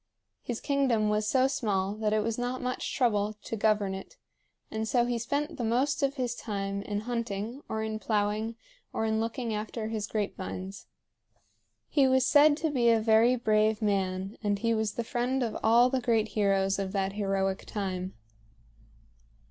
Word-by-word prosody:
His 240 -2 -4
kingdom 260 -7 +1
was 210 0 0
so 260 -1 +4
small 210 -8 0
that 215 0 -1
it 215 0 +2
was 230 +1 -2
not 245 +1 -2
much 250 0 -3
trouble 215 -5 +1
to - - -4
govern 210 -2 +1
it, 190 0 -9 0.5
and 220 0 -2
so 240 +1 +2
he 240 -1 -1
spent 285 +6 -2
the 245 - -3
most 250 +7 +1
of 275 0 +1
his 250 -3 -1
time 200 -3 -3
in 205 0 -3
hunting 230 +1 -3
or 220 0 -2
in 220 0 -3
plowing 215 +1 -1 0.4
or 220 - -1
in 220 0 +1
looking 230 +1 -2
after 215 +1 -4
his 215 -2 -3
grape 210 -2 -2
vines. 190 +1 -7 1.0
He 275 -3 +3
was 260 0 +3
said 295 0 +6
to 320 -1 -1
be 240 -4 +3
a 230 -1 +5
very 225 +3 +4
brave 215 -2 +2
man, 195 -2 -1
and 205 -1 +1
he 230 +3 +1
was 220 -2 0
the 235 - -2
friend 245 +3 -1
of 230 - -3
all 235 +3 +5
the 260 -1 0
great 225 -3 +1
heroes 195 -2 +1
of 195 0 -3
that 195 -1 0
heroic 195 -2 -1
time. 185 -3 -4
220 Hz, 180 wpm, -29 LUFS, 205-245 Hz, 1.0 s, said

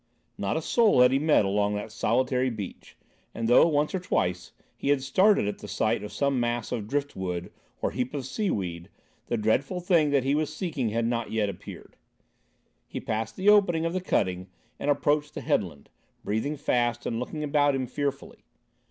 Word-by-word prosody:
Not 100 +8 -1
a 160 - -3
soul 220 - +4
had 125 0 +6
he 135 - +2
met 150 -8 +3
along 100 +1 +1
that 105 - -5
solitary 130 +2 +1
beach, 105 -6 -8 0.4
and 115 0 -2
though, 120 +7 +6
once 150 -2 +1
or 190 - 0
twice, 90 - -1 0.2
he - - -3
had 140 -2 +2
started 185 - +3
at 105 - -4
the 105 - -9
sight 110 +1 0
of 105 - -7
some 140 -2 0
mass 120 -1 -1
of 105 -3 -3
drift 145 +3 -2
wood 90 -2 -4 0.3
or - - +1
heap 125 +3 -3
of 135 -3 -3
seaweed, 95 - -3 0.4
the 120 - -1
dreadful 125 - 0
thing 170 -4 +3
that 140 -2 +2
he 135 +1 +1
was 155 0 0
seeking 155 - -2
had 115 +2 -1
not 115 -1 -2
yet 110 -2 0
appeared. 95 - -10 0.9
He - - -5
passed 110 0 -3
the 195 +2 +2
opening 180 -6 +4
of 165 - -1
the 185 - -1
cutting 95 - -1 0.3
and - - -2
approached 145 +1 +1
the - - -4
headland, 70 - -1 0.4
breathing 110 +9 -2
fast 120 -4 0
and 115 - -2
looking 150 +5 -4
about 145 -1 +2
him 130 -1 -1
fearfully. 140 +2 -4
130 Hz, 190 wpm, -27 LUFS, 110-150 Hz, 0.9 s, had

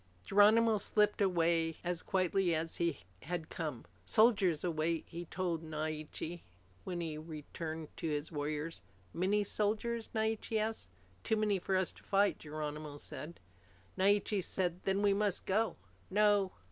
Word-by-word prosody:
Geronimo 215 +2 +5
slipped 210 +1 +2
away 165 -3 +2
as 175 -1 -1
quietly 185 -2 +1
as 160 +1 -2
he 170 -4 0 0.2
had 170 0 -4
come. 150 -7 -4 0.2
"Soldiers 195 - +4
await," 165 -1 0
he 170 +1 -6
told 170 -2 -2
Naiche 155 +1 -4 0.4
when 175 -2 -3
he 165 -2 -3
had 155 +2 -8
returned 155 +1 -6
to 165 - -2
his 150 +1 -2
warriors. 150 +2 -3 0.3
"Many 200 +4 +2
soldiers?" 220 +3 -1
Naiche 220 0 -1
asked. 220 - -2 0.3
"Too 220 - +2
many 210 -2 +2
for 190 +1 0
us 185 -1 +1
to - - -17
fight," 200 0 +2
Geronimo 150 -1 -5
said. 155 +3 -7 0.6
Naiche 200 0 +2
said, 180 -1 -1
"Then 195 +1 +1
we 200 -1 +5
must 200 -2 0
go." 215 +4 +1 0.3
"No. 205 -1 +4
175 Hz, 145 wpm, -34 LUFS, 160-205 Hz, 0.6 s, Geronimo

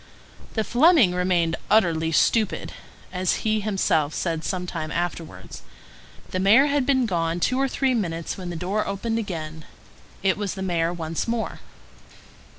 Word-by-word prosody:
The 220 - +1
Fleming 245 - +5
remained 180 -2 +1
"utterly 165 -6 +3
stupid," 215 +5 +1 0.4
as 185 +2 -1
he 215 0 +2
himself 190 -8 0
said 165 -2 -2
some 180 +1 -2
time 155 -3 -5
afterwards. 165 - -5 0.7
The 185 - -1
mayor 215 +9 +6
had 285 -2 +1
been 260 -3 +3
gone 170 -4 -1
two 255 +8 +1
or 270 - +2
three 265 0 0
minutes 170 -8 -2
when 180 -2 -7
the 175 - -5
door 190 +6 -1
opened 225 +4 -2
again; 160 -6 -5 0.6
it 190 -1 +2
was 205 -2 -3
the 190 - -4
mayor 170 -2 0
once 165 +1 -3
more. 230 -1 -2
185 Hz, 155 wpm, -24 LUFS, 165-220 Hz, 0.7 s, mayor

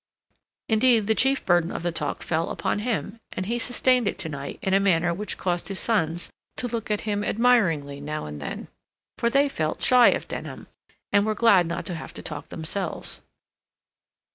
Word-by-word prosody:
Indeed, 225 -1 +4
the 220 - +3
chief 270 +4 +2
burden 175 -1 +3
of - - -5
the 175 - 0
talk 150 -3 -3
fell 165 0 -1
upon - - -1
him, 225 -1 -3
and 185 - -3
he 235 +4 -1
sustained 245 0 +2
it - - -1
to 160 - -3
night 140 -2 -6
in 190 - 0
a 195 - +5
manner 175 -3 +2
which 205 +4 -4
caused 175 -2 -1
his 195 - -4
sons 175 -7 0 0.3
to 250 - 0
look 230 -2 -4
at 210 -1 0
him 205 -1 -1
admiringly 185 -13 +2
now 150 - -4
and 75 -1 -7
then; 70 - -5 0.5
for 235 - +2
they 275 +3 +3
felt 155 - -2
shy 250 -2 +7
of - - +1
Denham, - - -6 0.5
and 200 - +4
were 215 0 0
glad 205 -6 +5
not 170 - -4
to 185 - -3
have 165 - -8
to - - -7
talk 150 -2 -6
themselves. 170 +3 -4
195 Hz, 190 wpm, -25 LUFS, 165-230 Hz, 0.5 s, shy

